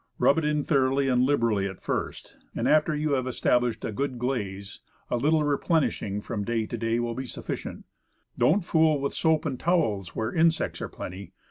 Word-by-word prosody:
Rub 140 - +4
it 160 - -2
in 150 -1 +1
thoroughly 135 -2 +2
and 125 -1 +3
liberally 115 -7 +2
at 95 -1 -8
first, - - -4 0.2
and - - 0
after 155 +1 +3
you 150 0 -1
have 130 -2 0
established 120 -2 +1
a - - -2
good 135 +3 -2
glaze, 100 -6 -3 0.3
a 125 - +2
little 150 +5 +2
replenishing 145 - 0
from 105 -1 -4
day 115 +1 -1
to 120 - -5
day 115 0 0
will 120 -1 -2
be 130 +2 -5
sufficient. - - -5
And - - -16 0.5
don't 205 - +4
fool 160 -4 +3
with 140 0 -2
soap 160 -1 +1
and 135 -5 -3
towels 110 - 0
where 110 +1 -2
insects 165 0 +1
are - - -4
plenty. 95 0 -8
130 Hz, 195 wpm, -26 LUFS, 115-150 Hz, 0.5 s, Rub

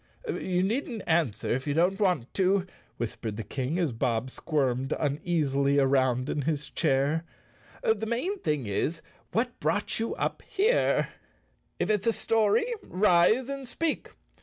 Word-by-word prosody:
"You 185 - 0
needn't 230 +1 -1
answer 160 -10 +1
if 130 +4 -1
you 145 - 0
don't 180 +5 +2
want 180 - +1
to," 190 0 +2 0.3
whis¬ 120 - -2
pered 110 -2 -4
the 115 - -4
King, 135 - -3
as 170 -6 +1
Bob 115 +1 -1
squirmed 135 -4 0
uneasily 145 -2 +1
around 130 -2 +3
in 150 - -1
his 150 0 -2
chair. 145 +1 +1 0.6
"The 220 0 +1
main 340 - -1
thing 150 - -1
is, 155 - -1 0.3
what 245 +2 -1
brought 205 +1 0
you 225 - -1
up - - -2
here? 420 +5 +2 0.4
" - - -42
If - - +1
it's 210 +1 0
a 230 - +4
story, 220 - +2 0.2
rise 200 - +3
and 275 -1 -5
speak. 315 +5 -1
165 Hz, 155 wpm, -28 LUFS, 135-215 Hz, 0.6 s, a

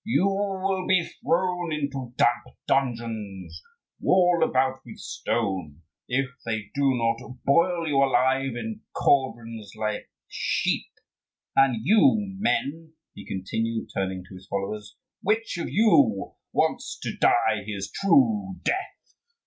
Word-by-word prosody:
You 215 -3 +2
will 195 -1 -1
be 185 -2 +3 0.2
thrown 175 -1 0
into 140 -5 -3
damp 120 +1 +1
dungeons, 115 -7 -2 0.4
walled 180 -2 +4
about 130 -2 +2
with - - -11
stone, 95 -9 -3 0.2
if 135 +2 +1 0.2
they 110 -3 -3
do 140 -1 +2
not 115 +2 -1
boil 170 +3 +3
you 145 -3 +1
alive 135 -1 +2
in 220 - -5
cauldrons 115 -6 0
like 105 -1 -3 0.2
sheep. - - -1 0.7
And 130 -4 +4
you, 220 - +6 0.2
men," 160 -6 -1 0.2
he - - -11
continued, 110 +4 -3
turning 95 -1 -2
to - - -13
his 95 +1 -12
followers, 100 +1 -4 0.3
"which 215 -3 0
of - - -3
you 155 - +3 0.2
wants - - 0
to - - -3
die 110 -3 +3
his 100 -1 -5
true 205 -3 +3
death? 380 - -3
135 Hz, 125 wpm, -26 LUFS, 110-180 Hz, 0.7 s, you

